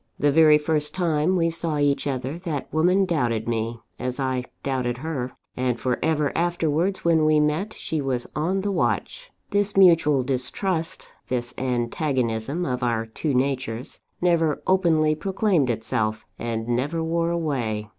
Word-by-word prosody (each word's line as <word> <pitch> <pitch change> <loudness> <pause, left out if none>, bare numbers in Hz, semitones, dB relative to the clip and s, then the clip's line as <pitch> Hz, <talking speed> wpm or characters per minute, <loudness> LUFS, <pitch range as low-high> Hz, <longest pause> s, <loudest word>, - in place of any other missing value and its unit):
The 145 - +3
very 155 0 +6
first 150 0 -1
time 170 -1 +1
we 165 -2 +2
saw 165 -2 -1
each 145 0 +1
other, 135 +3 -3
that 165 -6 -4
woman 180 +5 +3
doubted 120 - 0
me, 115 0 -2 0.2
as 125 +1 -3
I 130 -2 -1 0.2
doubted 125 -3 -1
her; 135 -3 -4 0.2
and 125 -2 -1
for 125 -1 -1
ever 150 -2 +1
afterwards, 175 +2 0
when 165 -2 +4
we 155 0 +4
met, 150 +8 0
she 155 -2 -3
was 130 -3 -2
on 180 +6 0
the 200 +1 -1
watch. - - -1 0.2
This 205 0 +1
mutual 165 -7 +5
distrust, 160 +7 -2 0.2
this 120 -1 -2
antagonism 125 +3 -1
of 125 -1 -2
our 115 -2 0
two 130 +5 -2
natures, 130 -2 -2 0.2
never 165 -4 +1
openly 165 -5 +3
proclaimed 185 - +1
itself, 110 -1 -1
and 115 -1 -3
never 140 +7 -1
wore 165 +1 0
away. 130 -11 -2
150 Hz, 150 wpm, -24 LUFS, 125-165 Hz, 0.2 s, very